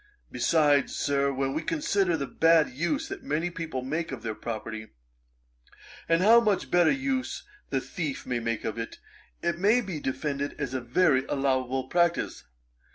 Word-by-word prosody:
Besides, 145 +2 +2
Sir, 140 0 +1
when 135 0 -1
we 155 - -1
consider 200 - +1
the 140 - -2
bad 165 +2 +3
use 155 +5 -1
that - - -6
many 160 +4 -1
people 160 -7 -4
make 160 +5 -3
of - - -6
their 110 -2 -2
property, 110 0 -6 1.2
and 165 +2 +3
how 230 +3 +8
much 210 -4 0
better 175 -2 +5
use 265 -1 -1 0.3
the 135 - +1
thief 155 -5 -4
may 125 -1 -1
make 115 -1 -3
of 110 +1 -3
it, 115 - -5 0.5
it 170 0 0
may 210 +6 +4
be 190 -9 -4
defended 140 +1 -3
as 135 -3 -3
a 130 - -2
very 135 +2 +3
allowable 130 -1 0
practice. 170 +5 0
150 Hz, 160 wpm, -27 LUFS, 130-175 Hz, 1.2 s, how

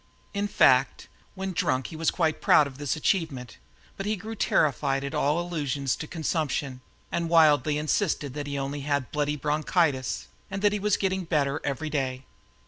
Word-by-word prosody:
In 200 0 -1
fact, 130 -8 +3 0.3
when 190 0 -3
drunk, 130 -5 0
he - - -7
was 160 0 +1
quite 160 -3 0
proud 150 - +6
of 140 -1 -9
this 145 0 -1
achievement, 155 - -1 0.4
but 195 - -4
grew 220 +4 -7
terrified 135 - +1
at 140 - -4
all 150 +4 +1
allusions 145 -6 -1
to 155 - -6
consumption 150 -5 -2 0.3
and 170 -1 -1
wildly 150 -3 +4
insisted 150 -2 0
that 145 0 -5
he 140 0 -3
only 140 +1 -3
had 140 -2 -1
"bloody 150 0 0
bronchitis," 150 -1 0 0.2
and 195 +1 -5
that 205 0 +4
he 210 - -1
was 210 0 +1
getting 190 -1 -1
better 145 -4 0
every 140 +3 -3
day. 130 -3 -2
150 Hz, 170 wpm, -27 LUFS, 140-170 Hz, 0.4 s, proud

